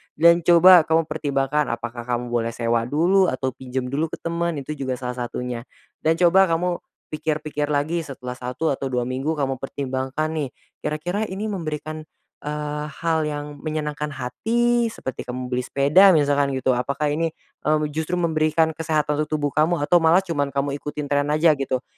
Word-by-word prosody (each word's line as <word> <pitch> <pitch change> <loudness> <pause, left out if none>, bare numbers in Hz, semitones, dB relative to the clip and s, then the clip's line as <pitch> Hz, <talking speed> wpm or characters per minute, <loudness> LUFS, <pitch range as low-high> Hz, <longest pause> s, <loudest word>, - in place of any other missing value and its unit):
Dan 170 +2 +6
coba 175 0 +7
kamu 160 +1 +3
pertimbangkan, 145 -1 -1
apakah 120 0 -5
kamu 120 0 -2
boleh 115 -1 -1
sewa 115 0 0
dulu, 180 +7 +3
atau 130 -3 -1
pinjam 130 +1 -4
dulu 150 +4 0
ke - - -6
teman, 170 0 -1
itu 140 0 -5
juga 135 -4 -3
salah 125 0 -5
satunya. 125 0 -5 0.3
Dan 160 +1 +2
coba 180 +3 +5
kamu 175 +1 0 0.3
pikir-pikir 150 -1 -2
lagi, 150 +3 0
setelah 125 -2 -7
1 125 +6 -2
atau 135 0 -2
2 125 -1 -1
minggu 130 +6 -2
kamu 135 -3 -2
pertimbangkan 135 +2 -3
nih, 150 -5 -2 0.3
kira-kira 175 +8 -2
ini 205 +3 -4
memberikan, 155 -3 -5 0.3
eee, 150 0 -4
hal 160 0 -1
yang 145 -1 -5
menyenangkan 150 -1 -3
hati, 235 - +1
seperti 130 - -6
kamu 125 0 -5
beli 125 - +1
sepeda, 165 +9 +5
misalkan 145 -2 +2
gitu, 130 0 +1
apakah 140 +4 -1
ini, 165 +1 -1 0.3
mmm, 155 0 +3
justru 160 +4 -2
memberikan 160 -1 +2
kesehatan 155 -2 -1
untuk 155 0 -1
tubuh 145 -1 -1
kamu, 155 +2 +1
atau 175 +4 +4
malah 165 +4 +4
cuman 145 -6 -1
kamu 140 +1 -1
ikutin 150 0 -5
tren 145 0 +2
aja 155 +2 +4
gitu. 130 -1 -1
150 Hz, 170 wpm, -23 LUFS, 135-165 Hz, 0.3 s, coba